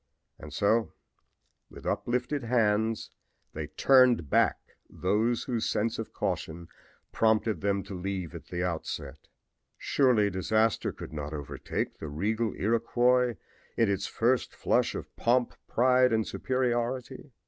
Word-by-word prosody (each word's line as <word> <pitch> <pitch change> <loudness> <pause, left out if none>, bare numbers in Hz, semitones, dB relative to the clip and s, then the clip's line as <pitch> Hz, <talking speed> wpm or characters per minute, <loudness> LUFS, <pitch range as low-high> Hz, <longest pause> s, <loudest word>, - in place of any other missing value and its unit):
And - - -10
so 110 +2 +1 0.8
with - - -13
uplifted 125 +4 -1
hands 110 -2 +1 0.4
they 75 -1 -4
turned 125 - +4
back - - +4 0.3
those 105 +8 0
whose 120 -3 -1
sense 115 +2 -1
of 115 - -5
caution 85 +1 -4 0.4
prompted 110 -1 +2
them 100 -1 0
to - - -9
leave 95 -2 -4
at 85 - -9
the 90 0 -3
outset. 85 -3 -4 0.5
Surely 120 -7 +2
disaster 110 +4 +1
could - - -10
not 75 0 -5
overtake 70 -2 -4
the 80 - -6
regal 105 +10 -1
Iroquois 120 +3 +2 0.4
in 115 -4 +3
its 100 0 -1
first 120 +1 0
flush - - +1
of - - -7
pomp, 120 +1 +2
pride 125 +1 +4
and 110 -1 +1
superiority. 130 +1 -2
110 Hz, 125 wpm, -29 LUFS, 95-120 Hz, 0.8 s, turned